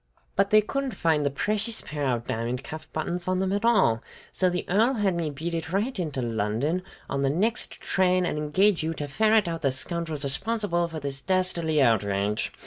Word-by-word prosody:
"But 195 +1 +3
they 215 +1 +6
couldn't 270 +4 -3
find 160 -3 +2
the 140 - +2
precious 210 +9 -1
pair 145 -2 -3
of 120 -2 -1
diamond 120 +3 -2
cuff 155 +1 -8
buttons 175 +3 -3
on 185 0 +1
them 190 0 0
at 205 +1 -1
all; 190 - +4 0.3
so 185 - +2
the 180 0 -2
Earl 225 +8 +3
had 205 -4 +1
me 170 -2 -1
beat 160 +4 -4
it 165 -1 -3
right 210 +4 -1
into 150 -7 -2
London 115 - 0 0.3
on 140 - -2
the 135 - +2
next 210 - 0
train, 185 -1 +1
and 170 - -1
engage 175 +6 +2
you 160 +1 -2
to 145 - -4
ferret 215 +6 +3
out 165 -1 -3
the 135 -3 +2
scoundrels 160 +2 -2
responsible 175 +4 -1
for 165 -1 -6
this 140 -1 -5
dastardly 170 -4 +1
outrage! 100 -3 +1
165 Hz, 200 wpm, -26 LUFS, 140-195 Hz, 0.3 s, they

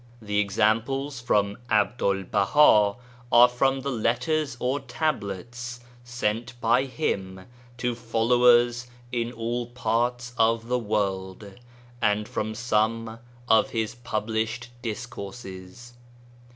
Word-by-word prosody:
The 105 -2 -1
examples 115 +7 0
from 105 -4 0
Abdul 105 -2 +1
Baha 105 +1 +4 0.4
are 120 +1 +8
from 135 +2 +1
letters 130 +3 -1
or 130 +3 0
Tablets 120 - -4 0.2
sent 120 0 -3
by 120 +3 +3
him 95 -10 -3 0.3
to 125 0 -1
followers 120 +1 +3 0.2
in 120 -1 -1
all 120 0 -3
parts 120 0 -1
of 115 +1 +2
the 125 0 +1
world, 100 -2 -2 0.5
and 105 0 +1
from 110 -2 -3
some 115 0 0 0.3
of 110 -2 +4
his 110 -2 -2
published 115 0 -3
Discourses. 110 -1 -7
115 Hz, 100 wpm, -26 LUFS, 105-125 Hz, 0.5 s, are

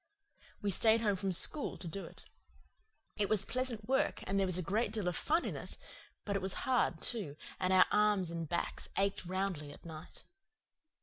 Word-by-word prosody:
We 200 - +1
stayed 220 +4 +4
home 205 -3 +2
from 190 0 -2
school 280 - +3
to 180 - -8
do 195 +4 -5
it. - - -14 0.9
It 205 -2 +1
was 210 -3 +6
pleasant 245 -2 -2
work 265 +1 +1
and 195 +1 0
there 195 - +2
was 185 -1 +1
a 180 - -1
great 210 +4 0
deal 215 -4 -2
of 175 - 0
fun 320 - +1
in - - -3
it; - - -7 0.5
but 200 - -1
it 195 - 0
was 190 0 -1
hard, 240 -11 +1
too, 200 -12 -3 0.2
and 185 0 +1
our 185 -1 +7
arms 210 -4 +3
and 165 -2 -4
backs 170 - -2
ached 195 -1 0
roundly 185 -5 -2
at 145 - -14
night. 160 -2 -10
195 Hz, 195 wpm, -34 LUFS, 180-215 Hz, 0.9 s, our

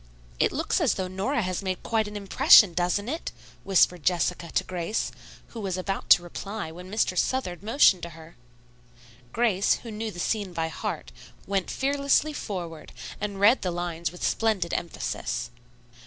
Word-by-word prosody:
"It - - +3
looks - - 0
as - - +2
though 185 - -2
Nora 205 +7 -1
had 185 -1 -2
made 185 -2 -2 0.2
an 215 -2 0
impression, 205 - +6
doesn't 180 +5 0
it!" 315 +6 -4 0.3
whispered 180 -2 +3
Jessica 175 +1 0
to - - +1
Grace, 180 +4 -2 0.4
who 235 - -8
was 190 -3 -2
about 195 +1 -4
to 175 - +7
reply 195 +1 -6
when 180 +3 -10
Mr. 205 -2 0
Southard 180 -4 -1
motioned 210 -4 +4
to 170 - -5
her. 165 +1 -14 1.0
Grace, 210 -4 +2
who 230 - -7
knew 220 +1 -4
the 195 - -10
scene 200 +1 -2
by 165 -1 -2
heart, 65 - -5 0.3
went 195 -1 -1
fearlessly 280 +2 +1
forward, 175 - -6 0.3
and 205 -1 -4
read 220 +6 +5
the 185 - -1
lines 170 -2 -3
with 180 - -2
splendid 210 -6 0
emphasis. 120 -7 -3
190 Hz, 160 wpm, -26 LUFS, 175-220 Hz, 1.0 s, to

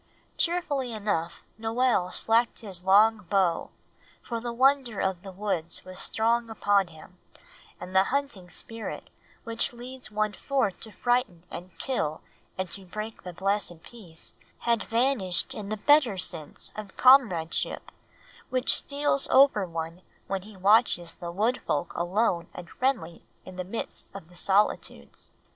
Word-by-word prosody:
Cheerfully 300 -8 0
enough 200 -6 -2 0.2
Noel 225 -4 +1
slacked 230 +4 +2
his 190 -5 -4
long 210 +4 +5
bow, 185 -4 +2 0.5
for 235 -1 -3
the 240 +1 -4
wonder 260 -2 +3
of 190 -2 -1
the 195 - -9
woods 185 -4 -3
was 185 0 -9
strong 230 +1 0
upon 205 -3 +2
him, 170 +2 -15 0.6
and 185 +1 -8
the 190 +1 +6
hunting 260 -10 -2
spirit, 225 +5 -6 0.3
which 230 +1 -1
leads 250 +1 -6
one 215 0 0
forth 260 -9 -1
to 220 - -8
frighten 240 -6 0
and 180 0 -9
kill 155 - -2 0.4
and 185 -2 -3
to 195 - -6
break 215 +4 -6
the 180 - -7
blessed 190 -2 -2
peace, 180 -9 -9 0.3
had 235 -2 +2
vanished 230 -6 +1
in 205 -2 -6
the 215 - -2
better 260 -2 +4
sense 165 -4 -2
of 210 -3 -8
comradeship 225 -12 +4 0.6
which 255 0 +3
steals 285 -1 +2
over 265 -8 +5
one 165 +1 -5 0.2
when 195 -1 -2
he 205 +1 -13
watches 190 -4 +3
the 170 -1 -7
Wood 220 +8 0
Folk 150 +4 -1
alone 175 0 0
and 175 -1 -9
friendly 230 -11 -1 0.2
in 185 - -10
the 185 - -3
midst 200 +6 -5
of 175 -4 -9
the 180 - -17
solitudes. 195 +4 0
205 Hz, 145 wpm, -27 LUFS, 180-235 Hz, 0.6 s, the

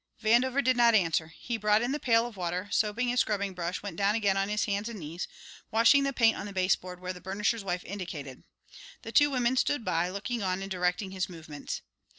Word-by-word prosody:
Vandover 245 +5 +3
did 255 0 +3
not 235 -1 +5
answer; 165 -5 +2
he 230 +8 -5
brought 210 +1 +3
in 245 - -1
the 295 - -1
pail 230 -3 +3
of 240 -2 -8
water, 180 -1 -2
and 205 - -10
soaping 220 +3 +1
his 245 +1 +1
scrubbing 200 -3 0
brush, 180 +1 -4
went 195 -5 -6
down 200 +1 +2
again 205 -4 +2
on 195 +1 0
his 210 0 0
hands 205 +2 -2
and 230 - -7
knees, 165 +2 -5 0.4
washing 230 +5 +5
the 275 0 0
paint 230 -4 +4
on 200 - -5
the - - -7
baseboard 185 -1 0
where 185 0 -4
the 180 - -12
burnisher's 210 +3 -1
wife 180 -2 -3
indicated. 160 -9 -7 0.6
The 225 - -7
two 290 +4 +5
women 255 -1 +1
stood 255 -3 +1
by, 175 0 +1
looking 215 +5 -3
on 190 0 -1
and 195 - -7
directing 180 +1 -1
his 190 -1 -2
movements. 155 -4 -7
200 Hz, 225 wpm, -29 LUFS, 180-230 Hz, 0.6 s, not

